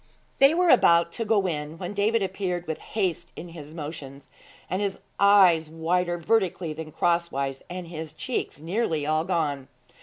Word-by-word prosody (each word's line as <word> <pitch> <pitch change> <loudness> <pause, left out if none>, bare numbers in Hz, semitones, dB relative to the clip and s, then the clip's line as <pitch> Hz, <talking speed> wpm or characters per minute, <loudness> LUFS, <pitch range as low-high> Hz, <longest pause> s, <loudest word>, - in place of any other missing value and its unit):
They 275 +4 +6
were 360 0 +3
about 170 -8 +5
to 230 - -3
go 205 -3 +2
in, 150 -1 -4
when 180 +3 -5
David 210 +2 +1
appeared 185 -2 -3
with 160 -2 -4
haste 185 -5 -2
in 175 - -8
his 155 -3 -10
motions, 145 -3 -8 0.4
his 195 +2 -2 0.2
eyes 185 -6 +5
wider 175 +2 0
vertically 180 -3 0
than 155 0 -8
crosswise, 140 -6 -1
and 180 -1 -6
his 160 -2 -7
cheeks 195 - -4
nearly 165 -2 -1
all 155 +1 +1
gone. 150 -7 -1
170 Hz, 155 wpm, -26 LUFS, 155-195 Hz, 0.4 s, They